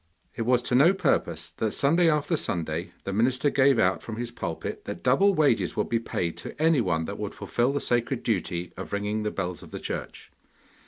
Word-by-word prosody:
It 115 - -3
was 125 -1 +3
to 125 - -3
no 155 +10 +6
purpose 85 - 0
that 110 - -1
Sunday 165 +5 +3
after 150 +2 +1
Sunday 85 - -2
the 100 - -4
minister 125 +6 +2
gave 135 -1 +4
out 95 -4 +2
from 110 - -6
his 120 +1 -4
pulpit - - -5
that - - -6
double 200 0 +4
wages 145 -7 +2
would 105 - -1
be 115 - +1
paid 85 -6 -3
to - - -8
anyone 115 - +2
that - - -6
would - - -4
fulfil 120 +2 0
the 145 - -1
sacred 120 0 0
duty 90 -5 -2
of - - -7
ringing 105 +1 -1
the 105 - -1
bells 90 -3 -4
of - - -12
the - - -6
church. - - -6
120 Hz, 205 wpm, -26 LUFS, 95-140 Hz, -, no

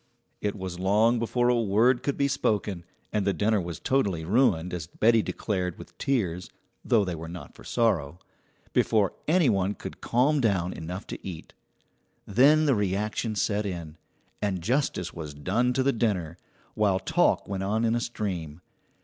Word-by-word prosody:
It 105 -1 -1
was 95 -3 -6
long 110 +5 +3
before 120 +1 +1
a 120 -1 +3
word 115 +4 +3
could 140 +1 -2
be 140 - +2
spoken, 100 -9 -1 0.3
and 105 -2 +1
the 100 0 +1
dinner 105 +2 +2
was 85 -2 -6
totally 100 -12 0
ruined, 90 -5 +2
as 85 -3 -4
Betty 115 +5 +3
declared 90 -5 -3
with - - -12
tears 90 -10 -1 0.3
(though 110 -4 +3
they 90 - -3
were 80 0 -6
not 85 -5 -9
for - - -15
sorrow), 90 -10 0 0.6
before 105 -4 +2
any 165 -1 +4
one 100 -2 +1
could - - -9
calm 135 +5 +2
down 95 -6 +1
enough 90 +5 -6
to - - -8
eat. 85 -4 -8 0.7
Then 145 +9 +5
the 140 - +4
reaction 105 +2 -1
set 105 +1 0
in, 85 -6 -5 0.5
and 95 -4 -1
justice 115 - 0
was 75 -4 -7
done 105 +12 +1
to 130 - +1
the 135 +1 +2
dinner, 95 -9 -1 0.4
while 100 -3 +2
talk 160 - +1
went 95 -1 -3
on 110 +4 0
in 115 - +2
a 120 - 0
stream. 90 -9 -4
100 Hz, 170 wpm, -27 LUFS, 90-120 Hz, 0.7 s, Then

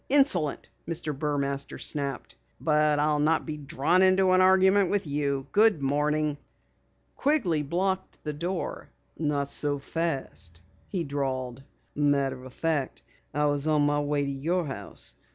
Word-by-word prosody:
Insolent!" 225 - +2 0.2
Mr. 160 -3 -2
Burmaster 140 -1 -2
snapped. 140 -2 -3 0.2
"But 150 -1 +2
I'll 150 0 +2
not 155 +2 +2
be 155 - -4
drawn 145 +4 +1
into 190 0 +4
an 185 0 +5
argument 190 +1 +5
with 205 -3 0
you. 140 -2 -1
Good 215 -5 +4
morning!" 150 +1 0 0.8
Quigley 235 - +1
blocked 185 +6 -2
the 150 - -3
door. 175 +4 -4 0.3
"Not 145 -3 0
so 145 0 0
fast," 135 - -4 0.3
he 185 -4 -2
drawled. 135 -3 -3 0.3
"Matter 140 -3 +1
of 130 - -10
fact, 155 -5 -1 0.3
I 150 +1 +1
was 145 0 0
on 150 -2 +3
my 145 0 +2
way 145 0 0
to 140 - -2
your 165 +6 -1
house. 135 - -6
150 Hz, 140 wpm, -27 LUFS, 140-170 Hz, 0.8 s, an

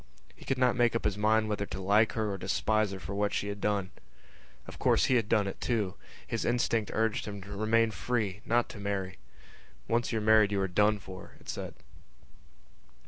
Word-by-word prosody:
He - - -15
could 135 - 0
not 125 -1 +3
make 120 -2 +2
up 115 - -1
his 105 -2 +1
mind 110 +1 +2
whether 105 -1 -2
to - - -6
like 105 +4 +3
her 110 -2 -1
or 100 - -3
despise 110 +3 +1
her 95 -1 -6
for 95 +3 -6
what 100 0 0
she 100 - -2
had 100 0 -6
done. 100 -3 0 0.7
Of - - -11
course - - +3
he 130 - +2
had 115 -3 +1
done 105 -3 +3
it 95 - -6
too. 105 -6 0 0.3
His 115 - -3
instinct 115 -2 +1
urged 110 -1 0
him 100 -1 -5
to 100 +1 -8
remain 110 +2 +2
free, 105 0 -2
not 120 +1 +1
to 105 - -9
marry. 100 -2 -3 0.7
Once 120 +1 0
you 115 - 0
are - - -1
married 110 -1 +5
you 100 - 0
are 95 - +1
done 105 +4 +3
for, 95 -2 -11
it - - -14
said. - - -5
105 Hz, 210 wpm, -30 LUFS, 100-115 Hz, 0.7 s, married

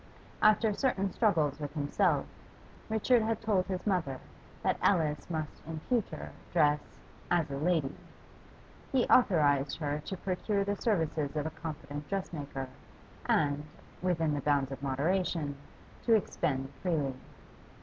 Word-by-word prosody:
After 215 0 +5
certain 200 -5 0
struggles 160 - +2
with 145 0 -5
himself, 145 -1 +2 0.6
Richard 225 +2 +3
had 220 0 0
told 205 -4 +1
his 185 -1 -3
mother 160 -10 0 0.4
that - - +1
Alice 155 -6 +2
must 155 -3 -4
in 160 -1 -4
future 240 -5 -1 0.2
dress 150 -3 +4 0.5
'as 170 -5 +2
a 140 - -2
lady'; 155 -2 +1 1.0
he 260 -3 +3
authorised 145 - +4
her 150 -2 -1
to 190 - -4
procure 195 +2 0
the 200 +1 -1
services 160 -8 0
of 150 -1 -1
a 160 - -2
competent 150 -2 -6
dressmaker, 145 -8 -3 0.6
and, 145 -1 +2 0.4
within 165 -4 +1
the 145 - -1
bounds 140 -1 +2
of 135 - -6
moderation, 150 +2 0 0.5
to 230 - +6
expend 135 -9 -1
freely. 155 -7 0
160 Hz, 130 wpm, -31 LUFS, 145-195 Hz, 1.0 s, to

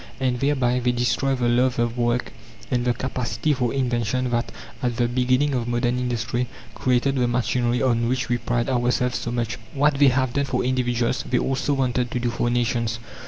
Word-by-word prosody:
And 125 -2 0
thereby 130 -3 +1
they 125 0 +1
destroy 125 +3 +1
the 125 -2 0
love 125 +1 +2
of 120 0 0
work 120 0 0 0.4
and 125 -1 +1
the 125 - +2
capacity 130 +3 -1
for 125 -3 0
invention 125 -1 0
that, 120 0 -1 0.3
at 120 -2 0
the 120 - +2
beginning 130 +3 +1
of 120 -2 -1
modern 120 +1 0
industry, 120 0 -1 0.3
created 130 +2 +1
the 125 -1 +2
machinery 120 0 0
on 120 -2 +2
which 130 +1 -1
we 120 0 0
pride 120 0 -1
ourselves 125 -1 +1
so - - -4
much. 120 -1 -2 0.2
What 145 0 +2
they 145 - +7
have 130 -1 +2
done 140 0 +1
for 125 -2 -1
individuals, 125 -1 0
they 125 - +2
also 135 +3 0
wanted 125 -2 0
to 125 - -2
do 120 0 -1
for 120 +1 -1
nations. 120 -1 0
125 Hz, 195 wpm, -23 LUFS, 120-130 Hz, 0.4 s, they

